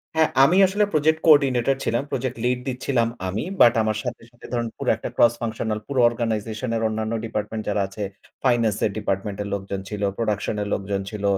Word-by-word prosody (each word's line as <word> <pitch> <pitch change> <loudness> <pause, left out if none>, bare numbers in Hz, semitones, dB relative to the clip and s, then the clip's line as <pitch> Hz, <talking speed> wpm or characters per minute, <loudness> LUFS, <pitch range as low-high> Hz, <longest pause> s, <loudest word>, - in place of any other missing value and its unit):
হ্যাঁ। 160 -1 +4
আমি 170 +7 +5
আসলে 205 +3 +1
project 155 +1 +3
coordinator 135 -4 +5
ছিলাম। 120 +3 0
প্রজেক্ট 130 -1 -2
লিড 125 0 +1
দিচ্ছিলাম 125 -2 0 0.2
আমি। 100 +4 -2 0.2
বাট 120 - +8
আমার 110 -1 0
সাথে, 125 -1 -5
সাথে, 120 - -16
ধরুন 120 -1 0
পুরো - - -2
একটা - - -6
ক্রস 120 -1 +5
ফাংশনাল 110 -1 -2
পুরো 140 -2 -1
organization 115 0 -3
এর 115 - -1
অন্যান্য 110 +1 -2
ডিপার্টমেন্ট 110 0 -3
যারা 105 0 +1
আছে, 95 +2 -6 0.4
ফাইনান্স 115 -5 +2
এর 105 - 0
ডিপার্টমেন্ট 100 -1 -2
এর - - -6
লোকজন 100 0 -3
ছিল, 105 -1 -5 0.2
প্রোডাকশন 105 -2 -1
এর - - -5
লোকজন 100 0 -2
ছিল, 105 -2 -6
115 Hz, 190 wpm, -23 LUFS, 105-125 Hz, 0.4 s, বাট